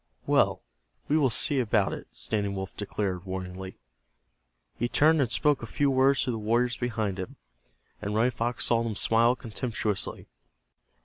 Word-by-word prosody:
"Well, -, -, +2 dB, 0.4 s
we 150 Hz, -, +2 dB
will 145 Hz, -4 st, +4 dB
see 135 Hz, +5 st, +2 dB
about 110 Hz, -5 st, +1 dB
it," -, -, -7 dB
Standing 100 Hz, -2 st, -2 dB
Wolf 95 Hz, 0 st, -5 dB
declared, 95 Hz, -3 st, -3 dB
warningly. 95 Hz, 0 st, -6 dB, 1.0 s
He 120 Hz, +1 st, -1 dB
turned 155 Hz, +3 st, +4 dB
and 125 Hz, -4 st, 0 dB
spoke 150 Hz, 0 st, +2 dB
a 115 Hz, -, -6 dB
few 140 Hz, +4 st, +1 dB
words 135 Hz, +1 st, +3 dB
to 130 Hz, -, -1 dB
the 115 Hz, -, -3 dB
warriors 120 Hz, +3 st, +1 dB
behind 110 Hz, -6 st, -2 dB
him, 95 Hz, -, -6 dB, 0.7 s
and 105 Hz, 0 st, -3 dB
Running 120 Hz, +3 st, +3 dB
Fox 120 Hz, +1 st, -1 dB
saw 115 Hz, -1 st, +3 dB
them 115 Hz, -2 st, -2 dB
smile 115 Hz, +4 st, +3 dB
contemptuously. 110 Hz, -4 st, -3 dB
115 Hz, 160 wpm, -28 LUFS, 100-125 Hz, 1.0 s, will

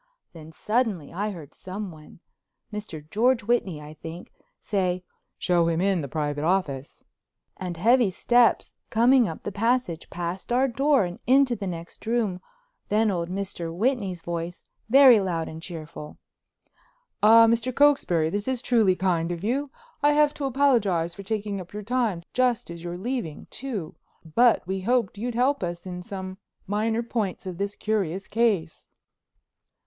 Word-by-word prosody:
Then 160 Hz, -1 st, -11 dB
suddenly 210 Hz, -, -1 dB
I 205 Hz, +4 st, -2 dB
heard 165 Hz, -8 st, -9 dB
someone—Mr. 185 Hz, -1 st, -9 dB
George 235 Hz, +2 st, +2 dB
Whitney, 200 Hz, -8 st, 0 dB
I 150 Hz, 0 st, -10 dB
think—say, 180 Hz, +3 st, -4 dB, 0.3 s
"Show 175 Hz, -2 st, +2 dB
him 165 Hz, -1 st, +1 dB
in, 190 Hz, -2 st, +2 dB
the 140 Hz, -, -4 dB
private 145 Hz, +1 st, -2 dB
office," 155 Hz, -6 st, -1 dB, 0.5 s
and 180 Hz, -2 st, -5 dB
heavy 235 Hz, +4 st, +4 dB
steps 240 Hz, +5 st, +3 dB, 0.2 s
coming 240 Hz, +1 st, +4 dB
up 160 Hz, -, -7 dB
the 205 Hz, -, -4 dB
passage, 220 Hz, -5 st, 0 dB
past 175 Hz, +5 st, -5 dB
our 255 Hz, +3 st, +3 dB
door 270 Hz, -1 st, +2 dB
and 175 Hz, 0 st, -7 dB
into 260 Hz, -1 st, +4 dB
the 200 Hz, -3 st, -5 dB
next 170 Hz, -1 st, -7 dB
room, 220 Hz, -6 st, 0 dB, 0.5 s
then 215 Hz, +1 st, +3 dB
old 170 Hz, -2 st, -2 dB
Mr. 185 Hz, -3 st, -4 dB
Whitney's 195 Hz, -2 st, -1 dB
voice, 170 Hz, 0 st, -4 dB, 0.3 s
very 260 Hz, -2 st, +8 dB
loud 175 Hz, -4 st, -2 dB
and 160 Hz, +1 st, -8 dB
cheerful. 160 Hz, -3 st, -8 dB, 1.0 s
"Ah, 225 Hz, +2 st, +8 dB
Mr. 230 Hz, +2 st, +1 dB
Cokesbury, 240 Hz, -, +3 dB
this 205 Hz, +4 st, -2 dB
is 260 Hz, -1 st, -1 dB
truly 220 Hz, -7 st, +3 dB
kind 175 Hz, -3 st, 0 dB
of 175 Hz, +1 st, -5 dB
you. 270 Hz, +6 st, -1 dB, 0.3 s
I 290 Hz, 0 st, +4 dB
have 295 Hz, 0 st, +4 dB
to 285 Hz, -, -4 dB
apologize 230 Hz, -11 st, +2 dB
for 200 Hz, -, -9 dB
taking 205 Hz, -1 st, -3 dB
up 180 Hz, +1 st, -13 dB
your 210 Hz, 0 st, -5 dB
time, 225 Hz, -6 st, 0 dB
just 245 Hz, -5 st, +1 dB
as 170 Hz, 0 st, -9 dB
you're 175 Hz, 0 st, -5 dB
leaving, 225 Hz, -, -4 dB
too, 220 Hz, -12 st, -5 dB, 0.4 s
but 240 Hz, -1 st, +4 dB
we 190 Hz, +1 st, -3 dB
hoped 230 Hz, -1 st, 0 dB
you 235 Hz, -, -2 dB
might 245 Hz, -, -4 dB
help 265 Hz, +4 st, +2 dB
us 175 Hz, -1 st, -4 dB
in 180 Hz, -1 st, -6 dB
some 190 Hz, -1 st, -7 dB, 0.3 s
minor 220 Hz, +3 st, 0 dB
points 220 Hz, -6 st, -3 dB
of 185 Hz, -1 st, -6 dB
this 200 Hz, +1 st, -2 dB
curious 195 Hz, -4 st, -2 dB
case." 205 Hz, -8 st, 0 dB
200 Hz, 155 wpm, -25 LUFS, 170-235 Hz, 1.0 s, very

